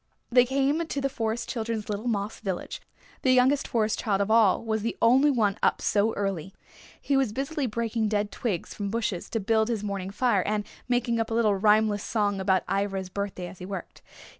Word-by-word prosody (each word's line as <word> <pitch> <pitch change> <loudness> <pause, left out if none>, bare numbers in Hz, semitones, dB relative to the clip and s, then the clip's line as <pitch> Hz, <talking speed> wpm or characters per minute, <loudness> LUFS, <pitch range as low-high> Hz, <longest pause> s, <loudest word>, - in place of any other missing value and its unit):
They 245 0 +6
came 275 +5 +1
to 315 -3 -3
the 275 0 0
Forest 225 -2 -2
Children's 225 -3 -3
little 210 +3 -3
moss 210 -2 -2
village. 190 -4 -4 0.4
The 260 - +4
youngest 260 +3 +3
Forest 220 -2 0
Child 200 -3 0
of 200 +2 0
all 225 -1 +4
was 220 -1 -1
the 230 +2 -3
only 260 +5 +5
one 215 -7 +1
up - - +2
so 210 +2 +2
early. 195 -3 -3 0.4
He 280 - 0
was 270 -5 +2
busily 275 +4 -2
breaking 225 0 -1
dead 205 -1 -1
twigs 200 -8 -3
from 200 -1 -4
bushes 215 -4 -2
to 225 - -1
build 220 +1 +2
his 225 -3 -2
morning 200 -2 -3
fire 205 -1 +1
and 210 +2 -1 0.2
making 245 -2 +1
up 225 - -1
a 225 - -2
little 225 -3 +3
rhymeless 210 +1 +3
song 205 -3 0
about 190 -1 +2
Ivra's 195 -2 -1
birthday 200 -2 -4
as 180 +1 -10
he 180 - -7
worked. 195 -2 -7
220 Hz, 200 wpm, -27 LUFS, 200-235 Hz, 0.4 s, They